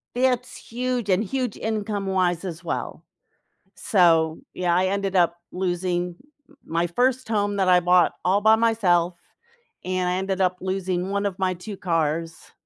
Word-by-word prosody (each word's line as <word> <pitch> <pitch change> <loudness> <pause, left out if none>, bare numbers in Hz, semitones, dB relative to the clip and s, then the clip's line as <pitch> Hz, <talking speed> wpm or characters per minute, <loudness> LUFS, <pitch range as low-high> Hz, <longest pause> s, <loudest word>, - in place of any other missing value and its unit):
It's 250 -1 0
huge 245 -2 -3
and 190 +2 +3
huge 250 +1 -3
income 210 -2 -3
wise 185 -2 0
as 170 -1 -6
well, - - -4 0.7
so, 165 -5 +3
yeah, 175 -1 0
I 185 +2 +2
ended 195 0 -1
up 170 -1 +3 0.2
losing 180 -1 -2 0.3
m 290 - -22
my 170 +1 0
first 250 +8 0
home 205 -2 0
that 190 -2 +1
I 180 -1 +6
bought 180 0 +4
all 190 +3 +3
by 220 +1 +5
myself 190 -7 +2 0.7
and 185 0 -1
I 180 - 0
ended 190 +1 -2
up 185 -1 +2
losing 185 -1 -2
1 200 +1 0
of 195 -1 -4
my 185 -1 0
2 195 +4 -8
cars 165 -2 -2
185 Hz, 160 wpm, -24 LUFS, 175-205 Hz, 0.7 s, I